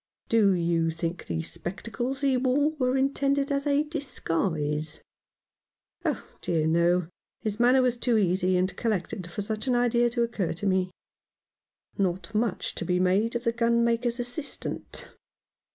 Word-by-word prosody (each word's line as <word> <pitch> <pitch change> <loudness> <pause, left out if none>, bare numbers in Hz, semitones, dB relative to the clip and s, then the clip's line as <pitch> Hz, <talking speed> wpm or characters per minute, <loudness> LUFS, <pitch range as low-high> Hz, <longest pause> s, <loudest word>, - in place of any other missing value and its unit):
" - - -45
Do 220 -5 +5
you 170 -2 +1
think 165 +2 -4
the 80 -1 -2
spectacles 240 - -4
he 275 -2 +3
wore 265 +4 +2
were 255 0 +2
intended 275 +1 +1
as 280 +1 0
a 285 +1 +3
disguise? 165 - -2 0.4
" - - -66
" - - -46
Oh - - -1 0.2
dear, 160 -3 +1
no! 170 +2 +3 0.3
His 215 0 -3
manner 250 +2 +5
was 245 -1 +1
too 235 -1 +2
easy 185 -2 +2
and 185 +1 0
collected 200 -4 -2
for 200 +4 -4
such 215 +4 -4
an 250 - +3
idea 240 0 +3
to 235 0 0
occur 225 -7 -1
to 175 - -5
me." 185 -1 +2 1.1
Not 185 +1 -1
much 215 -3 0
to - - -4
be 180 -1 +1
made 195 +6 +2
of 235 - -1
the 230 -2 +1
gunmaker's 235 +1 +2
as 245 - -1
sistant. 280 +3 -6
225 Hz, 165 wpm, -27 LUFS, 180-250 Hz, 1.1 s, Do